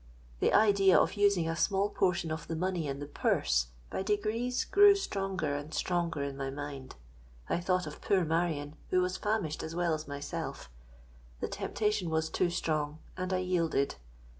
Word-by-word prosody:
The - - +3
idea 200 -3 +5
of - - +3
using 200 -5 +3
a 165 - -1
small 195 +5 +1
portion 175 -3 +1
of 160 - -4
the 165 - -3
money 180 -2 -1
in 140 0 -3
the 145 - -5
purse, - - +1 0.2
by - - -2
degrees 215 +5 0
grew 405 0 +7
stronger 195 - -2
and 145 +2 -5
stronger 170 -5 0
in 140 -1 -4
my 135 0 -3
mind. 140 -1 -7 0.5
I - - 0
thought 180 +1 +1
of - - -8
poor 195 -5 +2
Marion, 160 -2 -1
who 185 - +3
was 180 0 -2
famished 205 -8 -1
as 160 +1 -6
well 175 -2 +1
as 155 0 -4
myself;—the - - -8
temptation 210 -4 -1
was 160 0 0
too 180 - +1
strong—and 160 +2 -3
I 185 - +2
yielded. 165 - 0
170 Hz, 165 wpm, -31 LUFS, 145-190 Hz, 0.5 s, grew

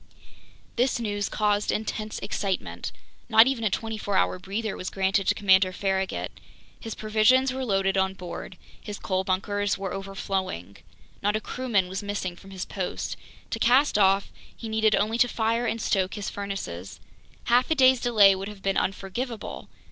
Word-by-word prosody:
This 245 0 +2
news 205 -3 -2
caused 210 -1 +1
intense 215 0 -3
excitement. 200 -1 -3 0.4
Not 220 0 +8
even 260 -3 0
a 215 - +3
24 215 0 -2
hour 90 0 +1
breather 215 +2 -3
was 185 - -4
granted 195 0 +1
to - - +3
Commander 190 -2 +4
Farragut. 190 0 -1 0.5
His 225 -2 -6
provisions 225 +5 +3
were 265 0 -3
loaded 195 -4 +1
on 190 0 0
board. 180 0 -7 0.2
His 210 -1 -6
coal 185 0 -1
bunkers 200 +2 0
were 195 -1 -4
overflowing. 195 - -4 0.4
Not 205 +1 +1
a - - +1
crewman 220 -4 0
was 190 +3 -4
missing 205 -3 -3
from 195 +2 -15
his 190 -1 -5
post. 190 -3 -4 0.4
To 225 - -2
cast 255 +6 +4
off, 195 -1 +3 0.3
he 230 - -7
needed 220 -1 +3
only 220 +3 0
to 245 - +6
fire 230 +1 0
and 230 +1 -1
stoke 190 -3 0
his 205 -2 -4
furnaces! 195 - -6 0.4
Half 245 +2 +3
a 320 - +3
day's 260 -3 +5
delay 210 -5 +6
would 190 +1 -4
have 205 -2 -10
been 195 0 +1
unforgivable! 210 +5 -3
205 Hz, 165 wpm, -26 LUFS, 190-225 Hz, 0.5 s, Not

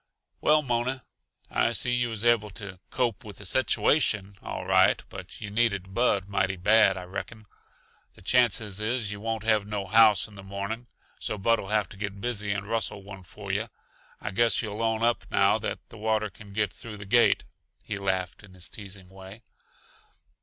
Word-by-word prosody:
"Well, 150 0 +4
Mona, 125 +1 -1 0.5
I 120 - +2
see 125 - +1
yuh 120 -1 +1
was 110 0 -3
able 115 -3 +4
to 100 -2 -8
'cope 120 -2 -1
with 105 -3 -10
the - - -7
situation,' 105 -7 +2
all - - -5
right - - +4
but 95 -1 -9
yuh 105 -2 -6
needed 100 -4 0
Bud 100 -5 +2
mighty 95 -1 0
bad, 100 +1 +4
I 90 - -5
reckon. 105 +4 -7 0.7
The - - -17
chances 110 -3 +3
is 110 -1 0
yuh 105 - -6
won't 110 0 -3
have 110 -2 +2
no 105 -2 -3
house 110 0 +6
in 110 - -16
the 100 - -10
morning, 100 +5 -5 0.3
so 105 - -3
Bud'll 110 0 +1
have 105 -1 +1
to 100 - -12
get 100 -1 -5
busy 105 -2 -2
and 100 0 -3
rustle 110 -3 -1
one 100 -1 -10
for 100 +2 -7
yuh. 105 +4 -1 0.5
I - - -4
guess 115 +4 +2
you'll 105 0 -4
own 115 0 0
up, 120 0 +2
now, - - +3
that - - -3
the 115 - -12
water 110 -1 0
can 100 +2 -14
get 105 -1 -1
through 115 -3 -8
the 100 - -9
gate." 120 +4 +4 0.4
He 100 -2 -4
laughed 95 -1 -2
in 95 -2 -15
his 90 - -7
teasing 95 -3 -10
way. 95 +4 -12
105 Hz, 190 wpm, -27 LUFS, 100-115 Hz, 0.7 s, house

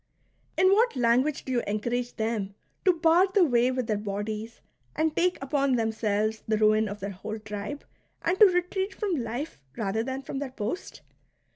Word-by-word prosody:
In 375 +1 +5
what 460 0 +3
language 255 +4 +2
do 260 - -4
you 245 -2 +2
en 210 +1 0
courage 245 +2 -2
them 220 -3 -2 0.3
to 370 - +7
bar 335 +3 +4
the 380 0 +3
way 245 -3 +3
with 255 -1 -1
their 215 -2 -1
bodies 210 +2 -4 0.4
and 315 0 +1
take 360 +1 +2
upon 275 -1 +1
themselves 220 -1 0
the 215 0 +2
ruin 215 0 +3
of 205 +1 -7
their 200 +1 -3
whole 195 +3 -6
tribe, 210 +6 -6 0.4
and 355 +3 0
to 425 - +10
retreat 370 +2 -1
from 395 -6 -1
life 235 - -5 0.2
rather 215 0 -1
than 265 +3 -4
from 270 - -5
their 280 -1 -3
post 235 - -5
240 Hz, 180 wpm, -27 LUFS, 215-320 Hz, 0.4 s, to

